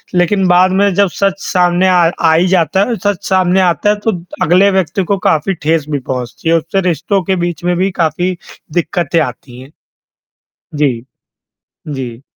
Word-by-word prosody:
लेक़िन 185 +2 +2
बाद 180 +1 +4
में 200 -2 +2
जब 200 -2 +3
सच 195 -1 0
सामने 180 0 +2
आ 180 -1 +4 0.2
आ 160 -1 +3
ही 170 +3 +3
जाता 185 +1 +2
है 235 - 0
सच 205 -3 -1
सामने 185 0 +2
आता 180 +3 +1
है 210 - +3
तो 225 - +3 0.3
अगले 185 +5 +4
व्यक्ति 190 0 0
को - - 0
काफ़ी 160 +5 0
ठेस 155 -1 0
भी 145 -2 -1
पहुँचती 125 +4 -5
है, 165 - +4
उससे 165 +4 -1
रिश्तों 175 +4 -1
के 190 +3 0
बीच 175 -1 -5
में 180 0 +1
भी 190 +1 0
काफ़ी 175 +4 -1 0.4
दिक़्क़तें 170 -2 0
आती 125 -1 -6
हैं। 135 +3 -14 1.0
जी, 135 -6 0 0.9
जी। 130 -4 -6
175 Hz, 175 wpm, -14 LUFS, 155-190 Hz, 1.0 s, बाद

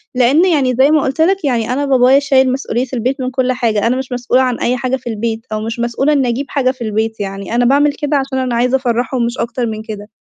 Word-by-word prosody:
لإن 265 +8 +4
يعني 275 -8 +1
زي 275 +3 +5
ما 310 -1 +4
قُلت 270 +4 -1
لك 380 -1 +2
يعني 245 -2 0
أنا 285 +2 -1
بابايا 265 0 +4
شايل 265 -2 +2
مسؤولية 255 -2 -2
البيت 255 +3 -2
من 255 0 -2
كلّ 255 0 0
حاجة، 230 -4 0
أنا 250 - +1
مش 260 -1 -5
مسؤولة 245 +1 +1
عن 255 -2 -1
أي 250 +1 0
حاجة 255 +1 -1
في 260 -2 -9
البيت 225 +1 -3
أو 215 0 -2
مش 230 +2 -5
مسؤولة 240 +5 0
إني 270 -4 +1
أجيب 260 +4 -2
حاجة 260 -3 +1
في 255 -3 -8
البيت 220 +1 -2
يعني، 195 +2 -5
أنا 245 0 +2
باعمل 285 +3 +3
كده 290 0 -1
عشان 265 -1 -2
أنا 255 -2 -1
عايزة 250 +3 +2
أفرّحهم 245 -1 -1
مش 235 +1 -4
أكتر 235 +1 -2
من 215 -1 -4
كده، 210 -2 -8
255 Hz, 255 wpm, -15 LUFS, 235-270 Hz, -, زي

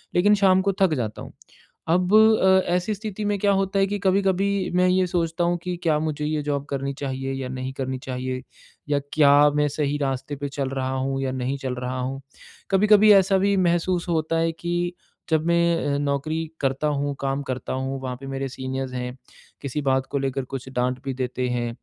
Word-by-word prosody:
लेकिन 205 +4 +5
शाम 185 0 +5
को - - +1
थक 185 -4 +4
जाता 110 0 -6
हूँ - - -11 0.6
अब 180 +3 +2
अ, 215 -4 +6
ऐसी 180 +4 0
स्थिति 210 0 -6
में 205 0 +1
क्या 200 0 +3
होता 195 +1 0
है 195 - +3
कि 205 +1 -2
कभी-कभी 195 0 +1
मैं 180 0 +4
ये 185 0 +2
सोचता 170 -1 -1
हूँ 175 0 +1
कि 180 0 -3
क्या 155 -3 +3
मुझे 155 -1 -2
ये 155 0 -1
जॉब 145 -1 -2
करनी 140 0 -2
चाहिए 135 -1 -3
या 135 -1 -4
नहीं 130 0 -4
करनी 130 -1 -3
चाहिए? 130 0 -4 0.5
या 145 -1 +2
क्या 145 -2 +5 0.2
मैं 150 0 +3
सही 145 0 -1
रास्ते 140 0 -2
पे 145 0 -4
चल 135 -1 -3
रहा 130 -1 -2
हूँ 135 +1 -1
या 130 -1 -1
नहीं 130 +1 -2
चल 130 -2 -3
रहा 125 +1 -4
हूँ? 135 +2 -4 0.5
कभी-कभी 210 +2 +6
ऐसा 195 0 +4
भी 200 +1 +2
महसूस 175 0 +1
होता 165 0 0
है 165 0 +1
कि 175 +1 -2 0.4
जब 160 0 +1
मैं 170 -3 +2
अ, - - 0
नौकरी 145 +2 -1 0.2
करता 135 +2 0
हूँ 145 -1 -1
काम 135 0 -1
करता 130 - -4
हूँ 135 +1 -3
वहाँ 130 -1 -4
पे 135 - -7
मेरे 135 0 -3
सीनियर्स 130 0 -4
हैं 125 0 -4 0.5
किसी 140 +2 -3
बात 130 0 +1
को 140 - 0
लेकर 135 0 -2
कुछ 130 0 -6
डाँट 125 0 -1
भी 135 - -2
देते 125 0 -2
हैं 120 -1 -1
145 Hz, 205 wpm, -24 LUFS, 130-180 Hz, 0.6 s, अ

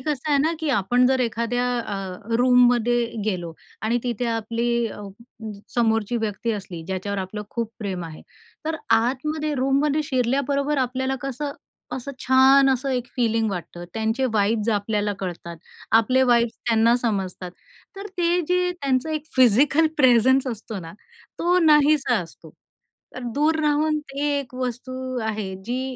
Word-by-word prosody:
कसं 295 +1 -3
आहे 285 - +4
ना 320 +2 +1
की 320 -1 -3
आपण 245 +3 +3
जर 260 0 +2
एखाद्या 235 +1 -1
अ, 220 -3 -4 0.4
रूममध्ये 245 -1 +4 0.2
गेलो 175 -5 -2 0.3
आणि 230 +2 +1
तिथे 245 -1 -2
आपली 235 +1 -1
अ, 210 - -8 0.7
समोरची 225 -1 +1
व्यक्ती 220 0 -2
असली, 190 -5 -6
ज्याच्यावर 190 +2 -3
आपलं 195 +3 -5
खूप 230 -2 -3
प्रेम 190 -5 -4
आहे, 160 -2 -10 0.4
तर 320 +1 -2 0.2
आतमध्ये 300 +6 -1
रूममध्ये 280 +3 +1
शिरल्याबरोबर 280 +2 0
आपल्याला 260 +2 -2
कसं, 275 +2 -4 0.4
असं 265 +2 -5
छान 265 +1 +6
असं 265 +1 -1
एक 250 -1 -1
फीलिंग 225 -3 +1
वाटतं 175 -1 -6
त्यांचे 225 +4 0
वाइब्स 215 +1 +1
आपल्याला 205 0 -1
कळतात, 170 -2 -6 0.4
आपले 255 +4 +3
वाइब्स 235 -1 +3
त्यांना 230 0 +4
समजतात. 195 -6 -3 0.5
तर 395 +1 -6
ते 350 0 +2
जे 360 0 +2
त्यांचं 265 +1 0
एक 310 -1 -3
फिजिकल 265 +6 +5
प्रेझन्स 260 0 +4
असतो 220 -3 -5
ना 165 -1 -9 0.5
तो 355 +2 +3
नाहीसा 300 -3 +4
असतो. 165 -1 -14 0.7
तर 255 - -6
दूर 310 +2 +2
राहून 305 +1 +1
ते 285 -1 -5
एक 255 -3 -9
वस्तू 255 +1 -4
आहे 210 -3 -3
जी 245 +3 -2
245 Hz, 145 wpm, -23 LUFS, 220-275 Hz, 0.7 s, छान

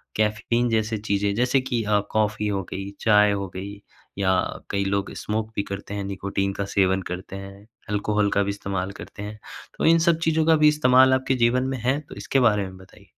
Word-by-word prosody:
Caffeine 110 +3 +1
जैसे 110 0 0
चीज़ें 100 -1 0
जैसे 125 +3 +2
कि 125 -3 -2
अ, 105 -1 +2
कॉफ़ी 105 -1 0
हो 100 -2 -1
गई 95 +1 -5
चाय 105 -1 +5
हो 100 -1 -2
गई 100 +2 -7 0.4
या 95 -1 +2 0.4
कई 100 0 0
लोग 100 0 -1
स्मोक 110 +1 -3
भी 100 - 0
करते 100 0 -7
हैं। 100 - -3
निकोटीन 100 0 -2
का 100 - -3
सेवन 95 -1 +1
करते 90 +2 -6
हैं, 100 +1 -10 0.2
अल्कोहल 105 0 +1
का 100 - +3
भी 100 - -3
इस्तेमाल 100 -1 -3
करते 105 - -9
हैं। 105 +1 -7 0.4
तो - - -1
इन 165 +1 +6
सब 165 -1 +2
चीज़ों 160 0 +2
का 160 0 +5
भी 150 0 +5
इस्तेमाल 130 -3 +5
आपके 130 0 +1
जीवन 125 +2 +2
में 135 - -2
है। 130 +4 +1
तो 150 - -12
इसके 135 - 0
बारे 105 -5 +3
में 95 -1 -8
बताइए? 95 +2 -17
105 Hz, 210 wpm, -24 LUFS, 100-120 Hz, 0.4 s, इन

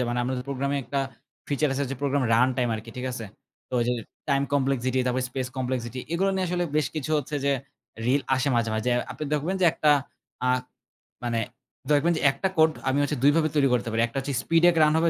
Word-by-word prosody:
যে, - - +2
মানে 120 +1 -1
আমাদের 125 0 -2
প্রোগ্রামে 140 +1 -1
একটা 140 - -1 0.5
ফিচার 145 +1 +1
আছে 140 +1 0
যে 135 - -3
প্রোগ্রাম 140 -1 +1
রান 125 +3 +5
টাইম 125 -1 +1
আরকি। 110 +1 -7
ঠিক 125 +1 -3
আছে? 115 -2 -5 0.4
তো - - -26
ওইযে 120 +1 +1 0.4
টাইম 140 0 +3
কমপ্লেক্সিটি, 130 -2 +1
তারপরে 125 +1 0
স্পেস 130 0 -2
কমপ্লেক্সিটি 125 -1 -2
এগুলো 195 +3 +2
নিয়ে 190 -1 0
আসলে 175 0 0
বেশ 155 - +2
কিছু 155 -1 -3
হচ্ছে 145 +1 -5
যে 140 - +3 0.5
রিল 135 +3 +3
আসে 130 +2 +1
মাঝে, 115 -1 +1
মাঝে। 110 +3 0 0.2
আপনি 155 - -5
দেখবেন 155 +6 0
যে 180 - +5
একটা 150 - +3 0.6
আ - - +3 0.8
মানে 115 -1 0 0.5
দেখবেন 150 +4 +4
যে, - - -3
একটা 140 +8 -1
কোড 160 0 +6 0.2
আমি 135 - +1
হচ্ছে 145 0 -1
২ 145 - +7
ভাবে 160 -1 +3
তৈরি 140 -2 +4
করতে 115 -3 0
পারি। 115 +1 +1
একটা 120 - -7
হচ্ছে 140 +1 -3
স্পিড 165 0 +2
এক 175 - +1
রান 150 0 +4
হবে, 165 +1 +3
135 Hz, 220 wpm, -26 LUFS, 125-150 Hz, 0.8 s, ২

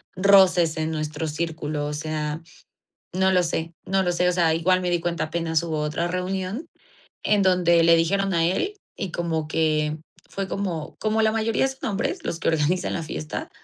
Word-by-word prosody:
roces 185 -4 +5
en 160 0 -1
nuestro 155 0 -3
círculo. 155 -1 -3
O 150 - -4
sea, 150 0 -3 0.7
no 190 +1 +3
lo 180 -1 +4
sé, 165 0 -2
no 190 0 +1
lo 180 - +1
sé. 180 +1 +2
O - - +2
sea, 170 -3 +2
igual 180 +3 +2
me 180 -1 -1
di 175 - +2
cuenta, 170 -2 -1
apenas 160 0 -1
hubo 160 -2 -2
otra 150 +3 -1
reunión 185 - -3 0.6
en 205 -1 +3
donde 175 -3 +4
le 165 0 +7
dijeron 195 +3 +1
a 165 -1 +3
él 375 - 0 0.2
y 195 -4 -4
como 165 -3 -2
que 155 -1 +1 0.3
fue 195 -1 -4
como 175 -7 -4
como 220 0 +1
la 220 - +4
mayoría 225 +3 +1
son 265 -4 -4
hombres 230 - -2
los 165 - -3
que - - 0
organizan 160 +3 +1
la 170 - -2
fiesta, 80 - -5
170 Hz, 190 wpm, -24 LUFS, 160-190 Hz, 0.7 s, le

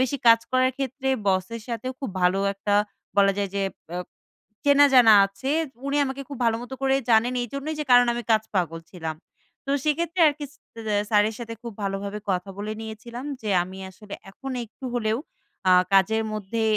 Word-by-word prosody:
বেশি 260 +2 +1
কাজ 230 0 +7
করার 255 0 +3
ক্ষেত্রে 265 0 -3 0.2
বসের 190 +5 0
সাথেও 250 +2 -3
খুব 270 -7 -4
ভালো 180 +2 +3 0.2
একটা 205 +1 -1 0.4
বলা 200 -1 +5
যায় 200 -1 -1
যে 200 - 0 0.3
অ্যা 175 - -4 0.7
চেনা 285 0 +6
জানা 240 -4 +8
আছে। 195 +8 -5 0.4
উনি 280 +1 0
আমাকে 270 0 -4
খুব 280 - -7
ভালো 225 -1 +3
মতো 265 +2 -7
করেই 270 0 +2
জানেন 230 +3 +4
এইজন্যই 275 +6 -4
যে - - -1
কারণ 245 0 +7
আমি 240 - -3
কাজ 220 0 +3
পাগল 165 -3 -1
ছিলাম। 160 -3 -5 0.5
তো - - -2
সেক্ষেত্রে 335 +4 0
আর 300 - +4
কিস 290 -2 -6 0.4
দ্যা 210 -1 +1
স্যারের 210 +1 +3
সাথে 230 -1 -6
খুব 235 - -6
ভালোভাবে 200 +1 -3
কথা 185 +1 -2
বলে 210 +1 -3
নিয়েছিলাম 230 +3 -8 0.2
যে, 215 - -4
"আমি 185 +2 -9
আসলে 200 +2 -10 0.2
এখন 270 +7 -8
একটু 230 +4 -15
হলেও 220 -1 0 0.5
আ - - +7 0.2
কাজের 205 +3 +4
মধ্যে" 215 +2 -3
225 Hz, 185 wpm, -25 LUFS, 200-265 Hz, 0.7 s, জানা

